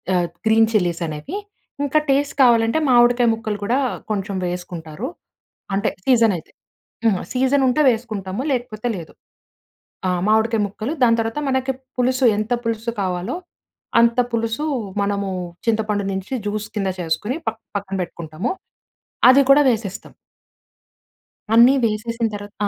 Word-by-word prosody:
ఆహ్, 175 -1 +1 0.2
green 220 0 +5
chillies 175 -5 +1
అనేవి. 155 - -5 0.5
ఇంకా 295 +2 +3
టేస్ట్ 280 +1 +1
కావాలంటే, 230 +2 +4
మామిడికాయ 240 0 +5
ముక్కలు 220 -2 -4
కూడా 235 +6 +1 0.3
కొంచెం 200 -1 -2
వేసుకుంటారు. 175 +2 -5 0.7
అంటే 205 +2 +1 0.2
సీజన్ 230 -5 +4
అయితే. - - -19 0.6
ఆ! 225 - +5 0.2
సీజన్ 265 +2 +2
ఉంటే 300 +5 +2
వేసుకుంటాము. 215 -3 -4
లేకపోతే 240 -2 -3
లేదు. 165 -2 -9 0.9
ఆ! - - +2 0.2
మామిడికాయ 220 0 +3
ముక్కలు, 220 +9 -4
దాని 230 -1 +5
తర్వాత 225 +6 -3
మనకి 260 0 0 0.3
పులుసు 255 +1 +2
ఎంత 215 +3 -3
పులుసు 230 +1 -2
కావాలో, 185 - -2 0.6
అంత 235 +1 +3
పులుసు 230 +5 -1 0.4
మనము 200 -1 -1 0.4
చింతపండు 215 -2 +1
నుంచి 190 +6 -5
జ్యూస్ 210 +1 -3
కింద 195 -2 0
చేసుకొని, 190 - -2
ప - - +5 0.3
పక్కన 195 -1 -5
పెట్టుకుంటాము. 170 +4 -5 0.8
అది 265 +2 +7
కూడా 285 +2 +8
వేసేస్తాం. 215 -5 -3 1.4
అన్నీ 240 +3 +7
వేసేసిన 230 +1 -1
తర్వాత 205 0 -8
225 Hz, 125 wpm, -21 LUFS, 200-245 Hz, 1.4 s, కూడా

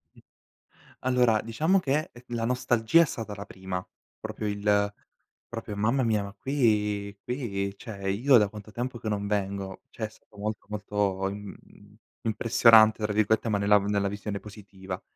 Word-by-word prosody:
Mh - - -17 0.8
allora 125 -4 +3
diciamo 155 +12 +2
che, 150 -2 0
ehm, 120 - -14
la 115 -1 -1
nostalgia 125 +3 +3
è - - +5
stata 115 -6 -5
la 100 0 -7
prima, 95 -1 -5 0.3
proprio 105 - -4
il 100 0 +1 0.5
proprio: 105 - -6
"Mamma 115 +6 +1
mia, 110 -3 +1
ma 100 0 -8
qui 105 -6 0
qui 100 -6 -3
cioè, 100 -4 -5
io 125 +6 +5
da 105 -3 +3
quanto 105 0 -10
tempo 120 +2 -4
che 110 - -4
non 100 -1 -2
vengo". 100 -2 -2
Cioè 110 - -4
è - - -6
stato 110 - -22
molto, 105 0 -4
molto 100 -2 -1
im 100 0 -7 0.7
"impressionante", 110 -1 +5
tra 105 - 0
virgolette, 110 +2 +2
ma 105 - +2
nella 100 +1 +5
v 100 - -5
nella 100 -1 +1
visione 100 0 -4
positiva. 95 -3 -9
105 Hz, 165 wpm, -27 LUFS, 100-115 Hz, 0.8 s, è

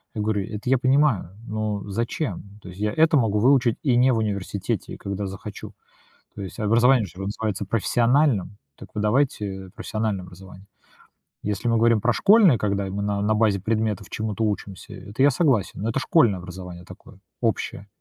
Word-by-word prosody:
Я 105 - -2
говорю, 105 -2 0
это 105 +3 -5
я 135 - +4
понимаю, 130 - +2
но 110 -1 -3
зачем? 105 -1 -4
То - - -11
есть 90 +2 -12
я 105 0 0
это 160 -1 +4
могу 110 -5 +1
выучить 125 0 +3
и 130 -5 +2
не 130 +1 +4
в - - +1
университете, 100 -2 -3
когда 100 +1 -4
захочу. 95 +2 -8 0.6
То 100 - -7
есть 95 - -8
образование 115 +2 +4
же 90 0 -12
называется 100 0 -3
профессиональным, 115 - +1 0.2
так - - -12
вы 105 - -1
давайте 105 -5 0
профессиональное 110 -4 -3
образование. 95 +2 -13 0.8
Если 105 +3 -2
мы 115 - +3
говорим 115 -1 +4
про 120 +3 +2
школьное, 200 - +6
когда 100 -1 -1
мы 100 +2 -3
на 100 0 -1
на 110 +1 +2
базе 105 -3 +2
предметов 110 -2 -1
чему-то 110 0 -2
учимся, 100 -2 -4
это 110 +6 -4
я 145 - +6
согласен. 125 - +1
Но 110 - 0
это 115 - -1
школьное 120 - +3
образование 90 0 -9
такое, - - -14 0.2
общее. 100 - -2
105 Hz, 175 wpm, -24 LUFS, 100-120 Hz, 0.8 s, школьное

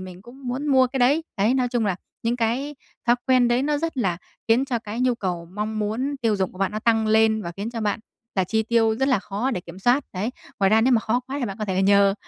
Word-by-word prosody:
mình 185 0 -10
cũng 255 +4 -13
muốn 260 +4 -3
mua 260 -3 +5
cái 265 +2 -4
đấy. 275 +6 +3
Đấy, 215 +5 +2
nói 255 -2 +1
chung 240 -3 0
là 190 -3 0 0.3
những 235 +1 0
cái 250 +5 -1 0.3
thói 240 0 +5
quen 255 -2 +4
đấy 240 +2 +2
nó 295 +1 0
rất 325 -1 -3
là 190 -9 0 0.3
khiến 235 +4 +4
cho 255 -4 -1
cái 220 +1 -6
nhu 250 -1 +2
cầu, 180 -6 -4
mong 215 +2 -3
muốn 235 +7 -2
tiêu 220 -3 +2
dùng 190 -2 -1
của 185 - -14
bạn 195 +1 0
nó 215 - -2
tăng 225 0 +2
lên 220 0 +3
và 170 - -5
khiến 205 +3 -4
cho 235 -1 -5
bạn 215 +1 -1 0.3
là 190 - +2
chi 220 +4 0
tiêu 225 0 +2
rất 265 +3 +1
là 260 - +3
khó 210 +6 -3
để 190 - -2
kiểm 175 +1 -11
soát, 245 +7 +2
đấy. 200 +5 -2 0.3
Ngoài 195 - +4
ra 220 +1 +5
nếu 255 +3 +3
mà 230 - +4
khó 230 +3 0
quá 275 +2 -4
thì 265 - -1
bạn 195 -4 -5
có 215 - -2
thể 190 -1 0
nhờ 200 0 +5
225 Hz, 280 wpm, -23 LUFS, 205-255 Hz, 0.3 s, mua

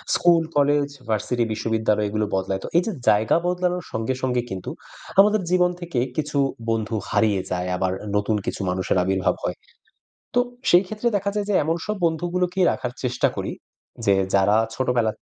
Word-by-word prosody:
School, 170 -2 +4
college, 145 0 +3 0.2
varsity, 110 +3 0
বিশ্ববিদ্যালয় 110 -1 0
এগুলো 110 +1 0
বদলায়। 95 0 -1
তো - - -4
এই - - +6
যে 225 - -1 0.2
জায়গা 105 +1 +3
বদলানোর 180 0 -1
সঙ্গে 110 +3 -1
সঙ্গে 125 -1 +1
কিন্তু 95 -3 -5 0.5
আমাদের 210 +1 +6
জীবন 180 -1 +4
থেকে 170 -7 -2 0.2
কিছু 150 -1 -2 0.3
বন্ধু 110 -1 -1
হারিয়ে 105 -4 +2
যায় 90 0 -1
আবার 95 0 0 0.2
নতুন 105 +1 +1
কিছু - - -3
মানুষের 95 +1 0
আবির্ভাব 95 0 +1
হয়। - - -1 0.8
তো 245 - +5 0.3
সেই 175 +1 +7
ক্ষেত্রে 215 +4 -1
দেখা 200 0 -1
যায় 205 -1 -1
যে - - +2
এমন 165 +2 0
সব 210 - -2
বন্ধুগুলোকে 175 +3 -1
রাখার 125 - -4
চেষ্টা 125 -1 +1
করি, - - -3 0.5
যে 100 - +5 0.2
যারা 100 +2 +4 0.2
ছোটবেলা 120 -3 +1
থ - - -45
125 Hz, 170 wpm, -23 LUFS, 105-175 Hz, 0.8 s, সেই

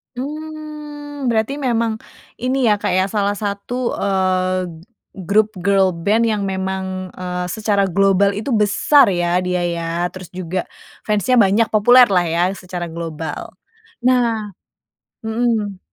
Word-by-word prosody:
Mmm, 295 0 -6
berarti 235 +5 0
memang 230 -4 0 0.4
ini 255 +2 0
ya, 205 - +1
Kak, - - -1
ya, 185 - +3
salah 205 -1 0
satu, 210 +5 -3
eee, 185 -1 +1 0.6
grup 215 +1 +3
girl 195 0 +3
band 205 +7 +1
yang 210 -2 0
memang, 190 -1 -3
eee, 180 0 -4
secara 205 -1 +1
global 195 +2 +3
itu 215 +7 -4
besar 210 +4 +4
ya 175 0 +1
dia 180 0 -1
ya. 170 -1 -3 0.3
Terus 185 -2 -10
juga 185 0 -3 0.4
fans-nya 210 +4 +1
banyak, 220 0 +4
populer 245 +4 +6
lah 180 - +4
ya 170 +1 0
secara 180 -2 -6
global. 160 -2 -6 0.6
Nah 230 -4 +1 0.8
mhm. 220 -4 -1
200 Hz, 130 wpm, -19 LUFS, 185-235 Hz, 0.8 s, populer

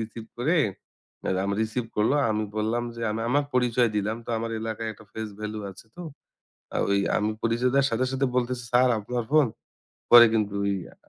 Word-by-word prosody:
Receive 110 0 -6
করে 160 +8 +2 0.8
Ram 100 +1 -1
receive 110 +2 -1
করলো। 105 +6 +3 0.2
আমি 110 0 0
বললাম 115 +3 0
যে 115 - -6
আমি 110 +1 -3
আমার 145 +3 +2
পরিচয় 125 -1 +3
দিলাম। 105 +2 -1
তো - - -6
আমার 115 +1 -3
এলাকায় 110 0 -4
একটা 110 - -16
face 110 -2 -5
value 105 0 -5
আছে 95 - -14
তো। 180 - -7 0.7
আ - - +1
ওই 100 0 +3 0.2
আমি 105 +1 0
পরিচয় 120 +2 +1
দেয়ার 140 0 +4
সাথে, 125 +3 +1
সাথে, 135 +1 +1
বলতেছে, 125 0 -1
"স্যার 125 +1 +5
আপনার 120 +3 -3
ফোন?" 155 -4 +5 0.6
পরে 120 0 +10
কিন্তু 105 -2 0
ওই 100 - +1 0.2
আ - - -17
115 Hz, 190 wpm, -26 LUFS, 110-125 Hz, 0.8 s, পরে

